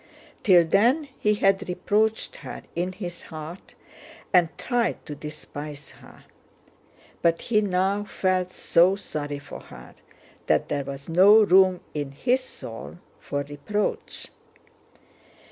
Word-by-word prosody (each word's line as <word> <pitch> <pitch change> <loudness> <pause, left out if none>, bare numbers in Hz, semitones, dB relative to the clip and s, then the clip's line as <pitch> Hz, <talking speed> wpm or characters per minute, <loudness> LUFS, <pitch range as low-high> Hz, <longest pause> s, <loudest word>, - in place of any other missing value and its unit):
Till 180 -4 +6
then 245 - +3
he 210 0 +2
had 195 -1 +2
reproached 215 +4 0
her - - -8
in 180 +2 -1
his 175 -3 -6
heart 160 +3 -9 0.6
and 175 -3 +5
tried 245 -2 -1
to 150 - -6
despise 150 -1 -8
her, - - -17 1.0
but 165 0 +3
he 215 -3 +1
now 195 +1 0
felt 185 -3 0
so 180 +1 +3
sorry 145 -7 -5
for 140 - -10
her - - -13 0.5
that - - +2
there 140 -2 -1
was 140 0 -7
no 200 +6 +7
room 185 -2 +5
in 145 -2 -4
his 250 - +1
soul 115 - -9 0.2
for 140 0 -3
reproach. 145 +9 -3
180 Hz, 125 wpm, -25 LUFS, 150-205 Hz, 1.0 s, no